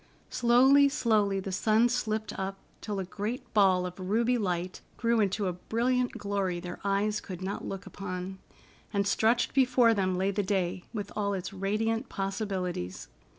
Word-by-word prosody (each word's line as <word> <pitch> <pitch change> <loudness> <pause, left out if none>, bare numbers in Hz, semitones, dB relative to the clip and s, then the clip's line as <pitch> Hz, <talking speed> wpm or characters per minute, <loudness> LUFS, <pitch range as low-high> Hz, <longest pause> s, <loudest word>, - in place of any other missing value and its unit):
Slowly, 265 +4 +5
slowly, 210 -7 +2
the 195 0 -5
sun 220 +5 +3
slipped 220 -3 -2
up, 195 0 -4 0.2
until 210 -2 -4
a 190 - -1
great 220 +8 -5
ball 190 -3 +4
of 180 +1 -7
ruby 225 +6 +1
light 180 -4 -2 0.2
grew 235 -1 +2
into 205 0 +1
a 180 - 0
brilliant 245 +7 0
glory 195 -3 -2
their 175 0 -7
eyes 200 +2 0
could 185 -1 -7
not 195 +2 -4
look 195 +1 -5
upon. 190 0 -6 0.5
And 200 -1 +1
stretched 220 +4 +2
before 250 -3 +4
them 190 -3 0
lay 190 +2 +1
the 205 +1 0
day, 185 -2 -1
with 205 -3 -5
all 200 -1 0
its 185 +1 -5
radiant 220 +5 -1
possibilities. 195 - -3
200 Hz, 160 wpm, -29 LUFS, 190-225 Hz, 0.5 s, Slowly